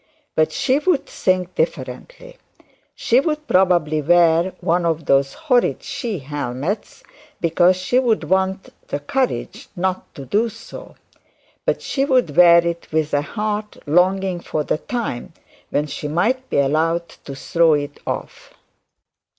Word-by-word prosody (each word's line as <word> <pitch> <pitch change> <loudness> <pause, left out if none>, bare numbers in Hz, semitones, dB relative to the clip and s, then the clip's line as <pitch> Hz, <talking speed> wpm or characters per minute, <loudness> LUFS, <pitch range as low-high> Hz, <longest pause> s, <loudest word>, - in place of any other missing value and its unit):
But 155 0 +2
she 275 0 +1
would 315 -2 +1
think 185 -1 -1
differently. - - -4 0.6
She'd 300 +5 +1
probably 175 -5 +2
wear 170 +2 +3
one 175 +2 +1
of 165 -2 -1
those 135 0 +2
horrid 275 -6 +1
she 260 -7 -4
helmets, 145 - -4 0.4
because 175 +2 +3
she'd 230 +5 +1
want 190 0 0 0.2
the 145 - -3
courage 255 - -2
not 185 0 -2
to 135 - -8
do 220 - +1
so; 225 +1 -11 0.7
but - - 0
she'd 265 - +1
wear 170 -1 +7
it 170 0 -3
with 155 -1 0
a 145 - +3
heart 210 +5 -4
longing 185 +3 +2
for 155 -2 -3
the 155 - -1
time 235 - -4 0.4
when 150 - 0
she 150 0 -5
might 235 - 0
be - - -1
allowed 160 +5 +1 0.2
to 140 - -7
throw 165 +4 +2
it 145 0 -4
off. - - -6
180 Hz, 135 wpm, -20 LUFS, 155-230 Hz, 0.7 s, wear